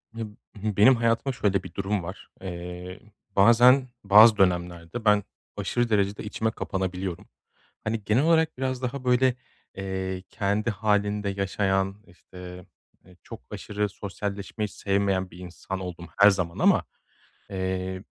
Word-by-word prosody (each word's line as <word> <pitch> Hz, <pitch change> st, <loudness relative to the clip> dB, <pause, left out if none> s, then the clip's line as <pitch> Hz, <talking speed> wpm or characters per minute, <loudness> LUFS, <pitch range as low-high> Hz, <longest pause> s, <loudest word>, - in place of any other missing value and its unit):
Ya 115 Hz, -, -4 dB, 0.3 s
b 105 Hz, -1 st, -3 dB
benim 120 Hz, +6 st, +7 dB
hayatıma 115 Hz, +3 st, +1 dB
şöyle 100 Hz, -5 st, 0 dB
bir 90 Hz, -, -10 dB
durum 100 Hz, 0 st, -2 dB
var. 95 Hz, +4 st, -8 dB
Eee, 90 Hz, 0 st, -7 dB, 0.4 s
bazen 120 Hz, +6 st, +6 dB, 0.2 s
bazı 105 Hz, +2 st, +8 dB
dönemlerde 90 Hz, +2 st, 0 dB
ben 105 Hz, -1 st, +4 dB, 0.3 s
aşırı 120 Hz, -1 st, 0 dB
derecede 100 Hz, -1 st, +1 dB
içime 110 Hz, +1 st, -2 dB
kapanabiliyorum. 95 Hz, -4 st, -4 dB, 0.6 s
Hani 110 Hz, -1 st, -2 dB
genel 110 Hz, +7 st, +3 dB
olarak 160 Hz, -2 st, +3 dB
biraz 130 Hz, -1 st, -2 dB
daha 130 Hz, +1 st, -4 dB
böyle, 125 Hz, 0 st, +3 dB, 0.4 s
eee, 95 Hz, -1 st, -4 dB
kendi 105 Hz, +2 st, -1 dB
hâlinde 105 Hz, -1 st, 0 dB
yaşayan, 95 Hz, 0 st, 0 dB
işte, 90 Hz, 0 st, -12 dB, 0.4 s
eee, 90 Hz, 0 st, -19 dB
çok -, -, -10 dB
aşırı 105 Hz, 0 st, -3 dB
sosyalleşmeyi 100 Hz, +1 st, -5 dB
sevmeyen 100 Hz, -2 st, -1 dB
bir 85 Hz, -, -13 dB
insan 90 Hz, +1 st, -6 dB
oldum 90 Hz, -2 st, -7 dB
her 100 Hz, +1 st, +9 dB
zaman 90 Hz, -4 st, -2 dB
ama, -, -, +4 dB, 0.6 s
eee, 95 Hz, 0 st, -3 dB
100 Hz, 130 wpm, -26 LUFS, 95-110 Hz, 0.6 s, her